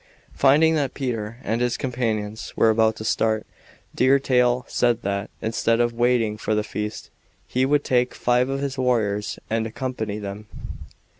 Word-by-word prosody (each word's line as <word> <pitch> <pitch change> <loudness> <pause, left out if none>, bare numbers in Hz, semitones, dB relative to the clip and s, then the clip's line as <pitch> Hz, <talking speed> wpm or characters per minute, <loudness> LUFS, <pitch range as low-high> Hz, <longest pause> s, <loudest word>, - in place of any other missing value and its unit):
Finding 150 +4 +4
that 145 -4 -1
Peter 115 -5 -3
and 115 +2 -1
his 125 0 0
companions 110 -5 -3
were 110 - +4
about 110 0 +3
to 110 - -7
start, 110 0 +1 0.5
Deer 130 +2 +4
Tail 125 -2 +2
said 120 -2 +1
that, 100 +1 -2
instead 115 +1 +1
of 120 0 +2
waiting 120 -2 +1
for 110 0 -1
the 105 - +1
feast, 105 0 -5 0.4
he 130 +1 +1
would 145 +1 +2
take 125 -1 +1
five 125 +1 +2
of 135 0 -2
his 140 -1 -3
warriors 105 -5 0
and 115 0 -1
accompany 110 -3 -4
them. 105 0 -7
120 Hz, 160 wpm, -23 LUFS, 110-130 Hz, 0.5 s, Finding